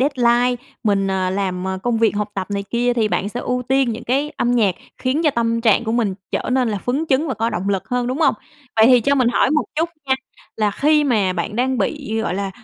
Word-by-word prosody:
deadline 245 -2 +2 0.2
mình, 200 -2 +2
ờ, 185 -1 0
làm 190 -2 -2 0.2
công 240 -2 0
việc 225 -2 +2
học 210 0 -2
tập 190 -1 -3
này 200 0 -2
kia, 245 +1 +1
thì 220 -3 +1
bạn 200 - -1
sẽ 240 +3 -5
ưu 250 0 -2
tiên 265 -1 +3
những 230 - -7
cái 280 +5 0
âm 240 - +1
nhạc 210 -7 +2 0.2
khiến 270 +5 0
cho 300 - +5
tâm 230 -2 0
trạng 230 0 +3
của 225 - -1
mình 220 -5 0 0.2
trở - - -2
nên 255 -3 +2
là 205 -2 -2
phấn 265 - -1
chấn 285 +4 +2
và 265 - -1
có 230 +1 -1
động 190 +3 -3
lực 195 +2 -1
hơn, 245 -1 -1
đúng 255 +4 -2
hông? 295 -4 +4 0.4
Vậy 220 +1 +6
thì 250 -1 +6
cho 280 +5 +2
mình 255 -3 +3
hỏi 260 - +2
một 305 0 +2
chút 325 +2 0 0.2
nha, 265 - +3 0.4
là 215 -1 +1
khi 300 +7 +2
mà 210 -8 +2
bạn 185 +4 -4
đang 255 +1 0
bị, 250 -8 -2
gọi 200 - -2
là, 195 0 -2
235 Hz, 250 wpm, -20 LUFS, 205-260 Hz, 0.4 s, Vậy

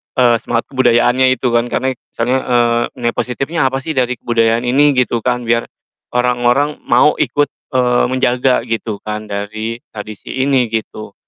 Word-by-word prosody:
eee, 120 -3 +4
semangat 115 -1 -1
kebudayaannya 130 0 +3
itu 130 - -2
kan. 120 0 +2
Karena 130 +2 0
itu 125 - -29
kesannya, 125 +3 0
eee, 120 -1 +2 0.2
nilai 120 -1 -1
positifnya 135 +7 -3
apa 130 0 -2
sih 160 - -3
dari 125 -1 +1
kebudayaan 115 0 +1
ini? 145 +4 +4
Gitu 125 -1 +2
kan. 125 -1 0
Biar 115 0 +1 0.5
orang-orang 125 +4 +1
mau 150 - +4
ikut, 145 -1 +1 0.2
eee, 125 -1 +2
menjaga, 125 0 +1
gitu 115 -2 -3
kan, 105 0 -4
dari 110 +3 -4
tradisi 105 -1 -9
ini, 135 -2 +2
gitu. 110 -2 -5
120 Hz, 160 wpm, -16 LUFS, 115-130 Hz, 0.5 s, eee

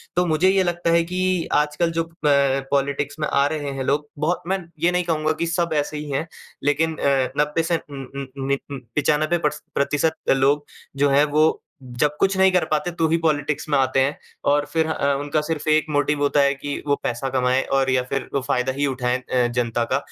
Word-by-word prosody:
तो 180 +1 +3
मुझे 175 +3 +3
ये 195 0 +3
लगता 175 -1 0
है 170 0 +4
कि 185 -2 0
आजकल 150 +3 +1
जो 165 0 0 0.2
प 140 -2 +3
पॉलिटिक्स 140 +1 -1
में 150 - 0
आ 140 - +2
रहे 145 -2 -3
हैं 135 - -3
लोग 145 +2 -1
बहुत 160 +4 0
मैं 190 - +1 0.2
ये 175 +2 +3
नहीं 180 0 +1
कहूँगा 155 -2 0
कि 170 - +1
सब 170 0 0
ऐसे 150 0 -1
ही 150 -1 -6
हैं 155 +5 -2 0.4
लेकिन 155 +3 +1
अ, 135 -2 +1
90 150 +2 +1
से 170 +1 +1
उम 140 -2 -7 0.2
उम 135 - -6 0.2
नि 140 - +2
95 150 +5 0
प्रस 150 -2 -2
प्रतिशत 150 +3 +1
लोग 140 +2 +3 0.3
जो 145 0 +3
हैं 140 +2 +4
वो 155 +1 +3 0.2
जब 130 +4 -1
कुछ 195 0 +2
नहीं 190 0 +5
कर 180 -1 +2
पाते 155 +3 0
तो 165 -1 0
ही 165 - +3
पॉलिटिक्स 150 -1 0
में 145 - +3
आते 135 0 +2
हैं। 135 +2 +1 0.3
और 145 0 +2
फ़िर 160 -1 +2
अ, 140 -3 +1
उनका 145 +1 -1
सिर्फ़ 155 -1 -4
1 155 0 +3
मोटिव 145 0 +1
होता 145 0 +2
है 140 0 +3
कि 145 +1 -5
वो 145 - +3
पैसा 120 +3 -2
कमाएँ 130 0 +1
और 135 -1 +2
या 130 -1 +2
फ़िर 135 - -3
वो 140 - +1
फ़ायदा 130 -1 0
ही 145 +1 0
उठाएँ 125 -1 0
अ, 125 -1 +3
जनता 120 -1 -1
का। - - +4
145 Hz, 220 wpm, -22 LUFS, 135-160 Hz, 0.4 s, नहीं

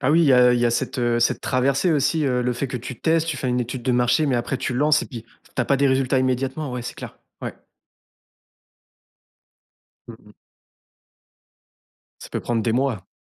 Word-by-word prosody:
Ah 140 +2 +2
oui, 170 - +5
il 160 - +4
y 135 - +5
a 125 -1 +6
il 120 - +1
y 120 - +3
a 120 - +2
cette, 130 +2 -2
heu, 120 -1 +1
cette 120 - +1
traversée 135 +6 +1
aussi, 155 +1 +1
heu, 125 -2 +1
le 125 - 0
fait 130 +3 -3
que 125 - -4
tu 125 +1 -8
testes. 165 0 +2
Tu 160 - -2
fais 130 -1 -3
une 125 0 0
étude 120 +1 -4
de 125 - 0
marché 125 +5 +2
mais 130 - +1
après 120 +3 -2
tu 130 - -3
lances 150 +4 +3
et - - -6
puis, 115 -5 -9
tu 115 - -8
as 125 - +1
pas 140 - +2
des 140 +1 +2
résultats 130 0 +2
immédiatement, 130 +3 -1
ouais, 125 -1 -4
c'est 120 - -6
clair, - - -10 0.2
ouais. - - -4 2.5
Mmh - - -9
mh. - - -17 1.9
Ça - - -10
peut - - -3
prendre 115 -2 -1
des 115 - 0
mois. 120 -7 -1
130 Hz, 220 wpm, -22 LUFS, 120-140 Hz, 2.5 s, a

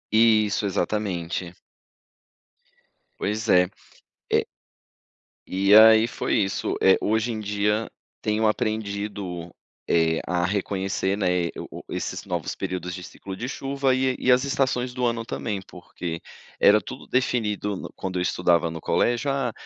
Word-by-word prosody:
Isso, 110 -2 +4
exatamente. 90 -3 -2 1.6
Pois 110 +3 -2
é, 90 0 +5 0.6
é - - +3 1.0
E 100 +2 +4
aí 110 +1 +8
foi - - -2
isso. 100 -1 0
Eh, 95 - +6
hoje 110 +3 +1
em 110 - -4
dia, 105 +1 -1 0.3
tenho 110 +1 +1
aprendido, 100 -5 -3 0.4
eh, 80 -1 +2
a 90 0 0
reconhecer, 95 0 -1
né, 90 -3 +1
eh, - - -6
o - - -6
o - - -12
o - - -5
esses - - -4
novos - - -3
períodos 90 -1 -4
de 90 - -8
ciclo 95 +1 -8
de 120 +6 -5
chuva 135 -1 0
e 130 0 +1
e 125 - +2
as 125 +2 +4
estações 130 -2 0
do 125 0 -1
ano 115 -1 -1
também. 105 -4 -3
Porque 90 -2 -7 0.4
era 105 +1 +7
tudo - - -9
definido 105 -5 0
no - - -7
quando 95 -1 -4
eu - - 0
estudava 85 -2 +2
no 80 - -6
colégio: 120 - +1
"Ah, 135 -3 0
105 Hz, 145 wpm, -24 LUFS, 90-115 Hz, 1.6 s, aí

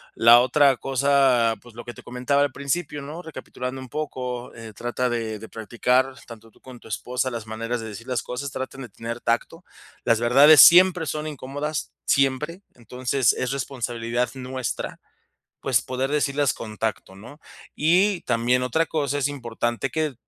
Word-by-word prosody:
La 120 +1 +7
otra 135 +2 +4
cosa, 135 -3 +2
pues, 120 -2 -16
lo 120 - -9
que 120 - -7
te - - -14
comentaba 125 +3 0
al 145 -1 +1
principio, 145 +2 -3
¿no? 150 +5 -7
Recapitulando 130 -5 -7
un 130 - -9
poco, 125 -3 -5
eh, 115 -1 -10
trata 120 +4 -2
de 115 -3 -3
de 110 - -9
practicar 125 +5 0
tanto 115 -1 -13
tú - - -25
con 130 -2 -13
tu - - -14
esposa 125 +3 -2
las 115 -2 -6
maneras 115 +2 -3
de 110 - -6
decir 110 +2 -9
las 125 -4 -2
cosas, 130 +2 -5
traten 130 +1 -6
de 125 - -8
tener 115 +3 -7
tacto, 165 +9 -2 0.4
las 115 -1 +2
verdades 135 +6 +7
siempre 180 +1 +8
son 150 +1 -3
incómodas, 145 +1 -5
siempre. 145 +6 +1
Entonces, 125 +2 0
es 125 - -3
responsabilidad 120 -3 -2
nuestra, 130 -1 -5 0.6
pues, 125 -3 +1
poder 130 +2 -3
decirlas 145 -1 +1
con 110 -1 -9
tacto, 110 -3 -3
¿no? 120 +10 -13 0.4
Y 180 +5 +3
también 120 +1 +1
otra 160 +6 +1
cosa, 145 -3 -1
es 145 - +1
importante 120 -2 -3
que, 155 -1 -1
130 Hz, 170 wpm, -24 LUFS, 120-140 Hz, 0.6 s, siempre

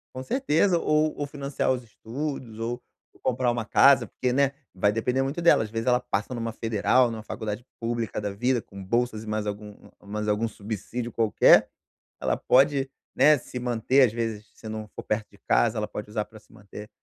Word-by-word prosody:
Com 130 - -4
certeza, 195 - +2
ou 155 -1 +1
ou 145 - -2
financiar 140 -2 -2
os 125 -1 -2
estudos 120 0 -6
ou 120 +2 -3 0.4
ou - - -22
comprar 125 0 0
uma 120 -1 -2
casa 135 +5 +5
porque, 125 -1 -2
né, 140 +1 +3 0.2
vai 100 +2 +2
depender 125 +4 0
muito 140 +5 -2
dela, 170 -8 +5
às 110 - -6
vezes, 115 +1 -3
ela 125 0 +4
passa 125 -2 -3
numa 115 -1 -3
federal, 115 +3 +2
numa 110 -1 -6
faculdade 110 +1 -5 0.2
pública 115 -1 -2
da 105 -1 -3
vida 125 +4 +1
com 100 -2 -11
bolsas 115 +2 -1
e - - -11
mais 105 0 -2
algum 105 0 -6 0.3
mais 105 +1 -4
algum 105 +2 +1
subsídio 110 +3 -5
qualquer, 115 -2 +5 0.5
ela - - 0
pode, 135 +1 +3 0.3
né, 150 0 +6
se 125 - -7
manter, 125 +2 +2
às 110 - -4
vezes, 110 -2 -4
se 110 - -10
não 110 0 -5
for - - -6
perto 105 0 -2
de - - -20
casa, - - +3
ela 105 0 -2
pode 105 0 -7
usar 105 0 -1
pra 110 - -15
se - - -25
manter, 105 +1 -11
115 Hz, 200 wpm, -26 LUFS, 105-130 Hz, 0.5 s, né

